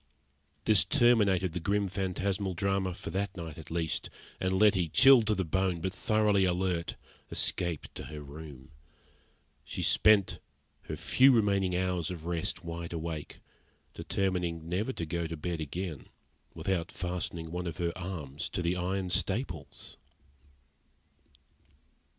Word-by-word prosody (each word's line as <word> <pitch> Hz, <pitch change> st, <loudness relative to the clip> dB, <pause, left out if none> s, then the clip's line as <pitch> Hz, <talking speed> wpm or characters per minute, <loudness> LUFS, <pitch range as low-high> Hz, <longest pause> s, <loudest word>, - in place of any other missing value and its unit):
This 105 Hz, -4 st, +5 dB
terminated 105 Hz, -, +3 dB
the 90 Hz, -, -3 dB
grim, 100 Hz, +3 st, +1 dB
phantasmal 95 Hz, 0 st, -2 dB
drama 95 Hz, -1 st, 0 dB
for -, -, -7 dB
that 100 Hz, 0 st, -2 dB
night 80 Hz, -2 st, -7 dB
at 80 Hz, -, -10 dB
least, 80 Hz, -1 st, -2 dB, 0.3 s
and 95 Hz, -, 0 dB
Letty, 95 Hz, -3 st, +4 dB
chilled 130 Hz, -, +7 dB
to 110 Hz, -, +3 dB
the 95 Hz, -1 st, -1 dB
bone, 95 Hz, +1 st, 0 dB
but 95 Hz, +3 st, -2 dB
thoroughly 105 Hz, 0 st, +2 dB
alert, 90 Hz, -2 st, 0 dB, 0.3 s
escaped 85 Hz, -4 st, 0 dB
to -, -, -7 dB
her 75 Hz, -1 st, -7 dB
room. 70 Hz, -1 st, -10 dB, 0.9 s
She -, -, -4 dB
spent 100 Hz, -3 st, +4 dB, 0.5 s
her -, -, -3 dB
few 135 Hz, +1 st, +5 dB
remaining 100 Hz, -6 st, +2 dB
hours 90 Hz, -3 st, 0 dB
of 85 Hz, -3 st, -7 dB
rest 85 Hz, -1 st, -2 dB
wide 85 Hz, 0 st, -5 dB
awake, 80 Hz, -2 st, -5 dB, 0.5 s
determining 90 Hz, -4 st, -2 dB
never 95 Hz, +9 st, -1 dB
to 85 Hz, -, -4 dB
go 85 Hz, +1 st, -2 dB
to 80 Hz, 0 st, -5 dB
bed 85 Hz, +1 st, -3 dB
again 80 Hz, 0 st, -5 dB, 0.5 s
without 85 Hz, +1 st, -1 dB
fastening 85 Hz, -2 st, -4 dB
one 90 Hz, +1 st, -3 dB
of 80 Hz, -3 st, -5 dB
her 85 Hz, -1 st, -1 dB
arms 80 Hz, -6 st, -5 dB
to 90 Hz, -, -3 dB
the 85 Hz, +2 st, +1 dB
iron 90 Hz, +1 st, -2 dB
staples. 95 Hz, -, -2 dB
90 Hz, 140 wpm, -30 LUFS, 85-95 Hz, 0.9 s, chilled